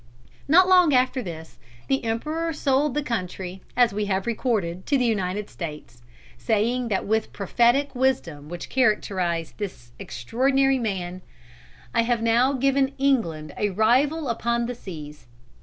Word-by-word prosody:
Not 360 Hz, +6 st, +6 dB
long 360 Hz, -6 st, +5 dB
after 255 Hz, +1 st, +2 dB
this, 160 Hz, -6 st, -9 dB, 0.3 s
the 270 Hz, -2 st, 0 dB
Emperor 305 Hz, +9 st, -2 dB
sold 285 Hz, -1 st, +1 dB
the 295 Hz, -, 0 dB
country, 185 Hz, -5 st, -4 dB, 0.2 s
as 245 Hz, -3 st, +4 dB
we 210 Hz, +1 st, -1 dB
have 190 Hz, -1 st, -1 dB
recorded, 210 Hz, -7 st, -2 dB
to 285 Hz, -, +3 dB
the 250 Hz, -, +1 dB
United 205 Hz, -2 st, -1 dB
States, 150 Hz, -8 st, -8 dB, 0.4 s
saying 230 Hz, -, 0 dB, 0.2 s
with 220 Hz, +1 st, +1 dB
that -, -, -25 dB
prophetic 240 Hz, +7 st, +2 dB
wisdom 205 Hz, -, -1 dB
which 175 Hz, 0 st, -6 dB
characterised 190 Hz, -9 st, 0 dB
this 120 Hz, -, -6 dB
extraordinary 265 Hz, -, +1 dB
man, 185 Hz, -5 st, -3 dB, 0.7 s
"I -, -, +3 dB
have 230 Hz, 0 st, 0 dB
now 240 Hz, +4 st, +3 dB
given 275 Hz, +1 st, +1 dB
England 170 Hz, -, 0 dB
a 210 Hz, -, +1 dB
rival 260 Hz, -, +2 dB
upon 235 Hz, 0 st, 0 dB
the 245 Hz, -, -3 dB
seas." 150 Hz, -, -10 dB
230 Hz, 140 wpm, -24 LUFS, 185-265 Hz, 0.7 s, Not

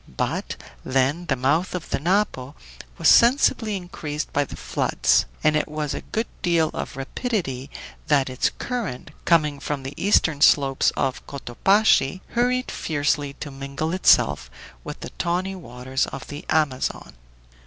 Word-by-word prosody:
But -, -, -2 dB, 0.3 s
then 135 Hz, +6 st, 0 dB
the 135 Hz, -, +1 dB
mouth 145 Hz, +9 st, +1 dB
of 180 Hz, -, -6 dB
the -, -, 0 dB
Napo 160 Hz, -5 st, 0 dB, 0.4 s
was 165 Hz, -, +1 dB
sensibly 235 Hz, -, +5 dB
increased 155 Hz, -4 st, -5 dB
by 145 Hz, 0 st, +2 dB
the -, -, -9 dB
floods -, -, +1 dB, 0.2 s
and 155 Hz, 0 st, +4 dB
it 155 Hz, -, +1 dB
was 150 Hz, -2 st, -3 dB
with -, -, -5 dB
a -, -, -25 dB
good 225 Hz, +2 st, -1 dB, 0.2 s
deal 165 Hz, -3 st, +2 dB
of -, -, -5 dB
rapidity 135 Hz, -, -3 dB, 0.4 s
that 145 Hz, -4 st, +3 dB
its 130 Hz, 0 st, 0 dB
current, 210 Hz, -, -4 dB
coming 150 Hz, -4 st, +3 dB
from 140 Hz, -1 st, -4 dB
the 135 Hz, +2 st, -6 dB
eastern 160 Hz, -7 st, +3 dB
slopes 135 Hz, -3 st, +4 dB
of 130 Hz, -, -1 dB
Cotopaxi, 185 Hz, -, +2 dB
hurried 250 Hz, +1 st, 0 dB
fiercely 145 Hz, -2 st, -1 dB
to 145 Hz, +1 st, -8 dB
mingle 140 Hz, +4 st, -4 dB
itself 65 Hz, -, +3 dB, 0.3 s
with -, -, -8 dB
the -, -, -7 dB
tawny 180 Hz, +3 st, -1 dB
waters 130 Hz, -6 st, -3 dB
of 135 Hz, -, -8 dB
the 145 Hz, +1 st, -8 dB
Amazon. 145 Hz, -, 0 dB
150 Hz, 150 wpm, -23 LUFS, 135-180 Hz, 0.4 s, sensibly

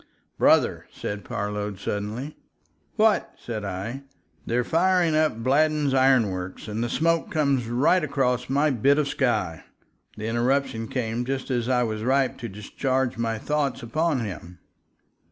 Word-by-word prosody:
"Brother!" -, -, +3 dB
said 105 Hz, 0 st, -5 dB
Parload, 105 Hz, -1 st, -3 dB
suddenly. 110 Hz, +10 st, -4 dB, 0.6 s
"What?" 220 Hz, -1 st, +2 dB
said 110 Hz, -3 st, -5 dB
I. 100 Hz, +7 st, -4 dB, 0.5 s
"They're 125 Hz, +1 st, +1 dB
firing 170 Hz, +2 st, +2 dB
up 155 Hz, 0 st, +3 dB
at 115 Hz, +1 st, -8 dB
Bladden's 150 Hz, +1 st, +2 dB
iron 130 Hz, -5 st, +4 dB
works, 95 Hz, +3 st, -6 dB
and 110 Hz, +2 st, -2 dB
the 120 Hz, -, -2 dB
smoke 165 Hz, +4 st, +1 dB
comes 140 Hz, -6 st, +1 dB
right 140 Hz, +9 st, +3 dB
across 125 Hz, -4 st, 0 dB
my 145 Hz, +3 st, +2 dB
bit 135 Hz, +4 st, +3 dB
of 150 Hz, -2 st, +1 dB
sky." 120 Hz, -, -1 dB, 0.5 s
The 110 Hz, -, -5 dB
interruption 120 Hz, 0 st, 0 dB
came 120 Hz, -1 st, -2 dB
just 135 Hz, +1 st, -3 dB
as 120 Hz, -1 st, 0 dB
I 125 Hz, -1 st, +3 dB
was 110 Hz, -2 st, -3 dB
ripe 130 Hz, +3 st, +1 dB
to 115 Hz, -, -5 dB
discharge 125 Hz, +5 st, -2 dB
my 115 Hz, -1 st, -1 dB
thoughts 145 Hz, +1 st, -1 dB
upon 150 Hz, +3 st, 0 dB
him. 90 Hz, -4 st, -7 dB
125 Hz, 150 wpm, -25 LUFS, 110-140 Hz, 0.6 s, iron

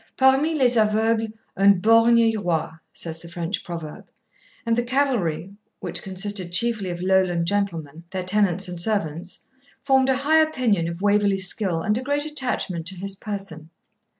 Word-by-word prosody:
'Parmi 270 Hz, +4 st, +3 dB
les 250 Hz, -4 st, +3 dB
aveugles 220 Hz, +1 st, +2 dB, 0.2 s
un 200 Hz, +1 st, +6 dB
borgne 230 Hz, +3 st, +5 dB
est 225 Hz, -1 st, +3 dB
roi,' 175 Hz, -7 st, -1 dB, 0.2 s
says 165 Hz, -1 st, -6 dB
the 170 Hz, -, -11 dB
French 170 Hz, +3 st, -4 dB
proverb; 165 Hz, -3 st, -8 dB, 0.6 s
and 230 Hz, 0 st, +2 dB
the 240 Hz, -, +1 dB
cavalry, 235 Hz, -, -1 dB, 0.3 s
which -, -, -5 dB
consisted 190 Hz, -1 st, -4 dB
chiefly 210 Hz, +1 st, -1 dB
of 175 Hz, 0 st, -5 dB
Lowland 185 Hz, -3 st, +2 dB
gentlemen, 170 Hz, -5 st, -2 dB
their 190 Hz, -1 st, -4 dB
tenants 195 Hz, -1 st, +1 dB
and 175 Hz, -1 st, -3 dB
servants, 175 Hz, -4 st, -2 dB, 0.4 s
formed 265 Hz, -1 st, +3 dB
a 260 Hz, -, +2 dB
high 305 Hz, +4 st, +3 dB
opinion 250 Hz, -, +1 dB
of 170 Hz, +3 st, -6 dB
Waverley's 205 Hz, -2 st, +3 dB
skill 180 Hz, -5 st, 0 dB
and 215 Hz, +1 st, +1 dB
a -, -, -5 dB
great 285 Hz, +2 st, -1 dB
attachment 250 Hz, -, -2 dB
to 190 Hz, -, -2 dB
his 195 Hz, +2 st, -4 dB
person. 195 Hz, -6 st, -6 dB
200 Hz, 160 wpm, -23 LUFS, 175-230 Hz, 0.6 s, un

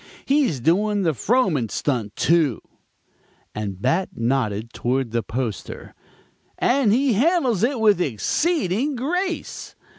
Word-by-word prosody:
He's 270 Hz, -, +2 dB
doing 200 Hz, -, +1 dB
the 165 Hz, -3 st, +2 dB
Frohman 165 Hz, -, +1 dB
stunt, 115 Hz, -7 st, -2 dB
too," 160 Hz, -8 st, +2 dB, 0.9 s
and 100 Hz, -3 st, -5 dB
Bat 165 Hz, -, 0 dB
nodded 115 Hz, -2 st, -1 dB
toward 125 Hz, -1 st, -1 dB
the 115 Hz, 0 st, 0 dB
poster, 110 Hz, -1 st, -5 dB, 0.6 s
"and 250 Hz, -4 st, +2 dB
he 255 Hz, +3 st, +3 dB
handles 255 Hz, -, +2 dB
it 245 Hz, +2 st, +1 dB
with 210 Hz, -5 st, +4 dB
exceeding 240 Hz, -, 0 dB
grace. 355 Hz, +9 st, -3 dB
175 Hz, 115 wpm, -22 LUFS, -, 0.9 s, with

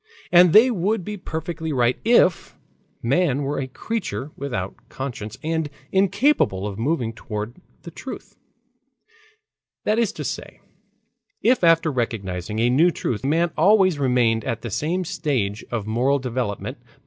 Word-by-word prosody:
And 175 Hz, -1 st, +7 dB
they 225 Hz, +7 st, +7 dB
would 200 Hz, -1 st, 0 dB
be 210 Hz, -, -4 dB
perfectly 160 Hz, -3 st, -5 dB
right 125 Hz, -2 st, +1 dB
if 220 Hz, -6 st, +3 dB, 0.5 s
man 140 Hz, +2 st, +2 dB
were 145 Hz, +2 st, -2 dB
a 135 Hz, -, -3 dB
creature 165 Hz, -, -4 dB
without 100 Hz, -9 st, -4 dB, 0.2 s
conscience 115 Hz, -5 st, -6 dB
and 160 Hz, -1 st, -1 dB, 0.2 s
incapable 195 Hz, -, +2 dB
of 100 Hz, 0 st, -5 dB
moving 120 Hz, -3 st, 0 dB
toward 110 Hz, +7 st, -6 dB, 0.2 s
the 170 Hz, -, -9 dB
truth; 260 Hz, +10 st, -9 dB, 1.5 s
that 215 Hz, +2 st, +1 dB
is 230 Hz, -4 st, +2 dB
to -, -, -6 dB
say, -, -, -6 dB, 0.8 s
if 245 Hz, -2 st, +3 dB
after 165 Hz, -1 st, +4 dB
recognizing 105 Hz, -6 st, -3 dB
a 120 Hz, +2 st, +2 dB
new 160 Hz, +8 st, +5 dB
truth, 125 Hz, -9 st, -3 dB
man 165 Hz, +5 st, +1 dB
always 185 Hz, -2 st, +4 dB
remained 120 Hz, -4 st, +2 dB
at 115 Hz, 0 st, -3 dB
the 120 Hz, -, -5 dB
same 175 Hz, -, -1 dB
stage 120 Hz, -11 st, -2 dB
of 115 Hz, -4 st, -3 dB
moral 125 Hz, +6 st, +1 dB
development. 125 Hz, -5 st, -3 dB
140 Hz, 140 wpm, -23 LUFS, 115-180 Hz, 1.5 s, And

